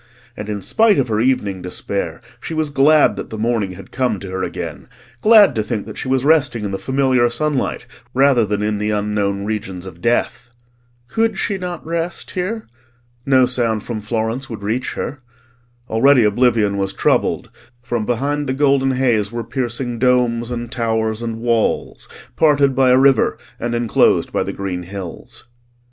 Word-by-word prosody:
And 105 0 -7
in 105 -2 -4
spite 220 -3 +3
of 130 -3 +1
her 110 -1 0
evening 105 -6 0
despair 100 +5 -4 0.2
she 160 - -5
was 155 -2 -1
glad 145 +2 +4
that - - -6
the 110 - -6
morning 110 -4 -1
had 95 +2 -12
come 125 -6 -1
to 95 -2 -8
her 95 0 -3
again: - - -5 0.3
glad 215 0 +7
to 110 - 0
think 110 0 -3
that - - -9
she - - -5
was 130 0 +1
resting 145 -8 +2
in 100 - -3
the 95 - -3
familiar 130 0 +2
sunlight 145 0 -1 0.3
rather 135 -2 +4
than 105 0 -1
in 105 -1 -1
the 105 0 -1
unknown 105 -1 -1
regions 100 -4 -4
of 85 -2 -11
death. 120 0 0 0.6
Could 225 - 0
she 195 0 -1
not 180 -2 -5
rest 170 +1 -3
here? 205 +5 -3 0.6
No 130 -2 +5
sound 115 -4 0
from 115 -3 -5
Florence 115 +4 -2
would 110 -3 -7
reach 115 +5 -2
her. 145 -1 -5 0.7
Already 125 +3 +4
oblivion 105 -2 +2
was 95 -1 -1
troubled; - - 0 0.3
from 120 -2 -2
behind 140 +6 -1
the 130 - 0
golden 135 -1 +2
haze 120 -6 +1
were 120 0 -4
piercing 120 0 -3
domes 120 -2 +2
and 120 -1 -5
towers 110 -2 -1
and 115 -1 -4
walls, 115 -2 -1 0.3
parted 145 -3 +3
by 130 0 +3
a 125 - +6
river 135 -3 +4 0.2
and 120 0 -2
enclosed 120 -2 +2
by - - +1
the - - -2
green 95 -2 -4
hills. 90 +2 -8
120 Hz, 175 wpm, -19 LUFS, 105-135 Hz, 0.7 s, glad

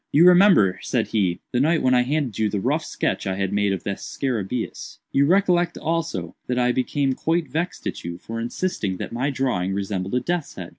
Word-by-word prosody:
"You 160 +4 +6
remember;" 180 - +6
said 120 -3 -1
he, 95 -5 0
"the 125 - +1
night 155 +4 +2
when 130 - +4
I 125 - +5
handed 130 -4 -1
you 110 -1 +2
the 105 - -2
rough - - 0
sketch - - -2
I 95 - -1
had 95 0 -2
made 100 -1 +2
of 95 -3 -3
the 100 - -2
scarabæus. 115 +1 -4
You 140 +1 +3
recollect 175 -1 +2
also, 160 - -2
that 125 - -1
I 125 0 +3
became 135 +2 0
quite 165 +4 0
vexed 170 +3 -3
at - - -4
you 85 0 -5
for 115 +5 -6
insisting 115 - -2
that - - -6
my 130 +4 0
drawing 125 -9 -1
resembled 100 0 -2
a - - +3
death's 175 +4 -3
head. - - -7
125 Hz, 210 wpm, -23 LUFS, 100-155 Hz, -, You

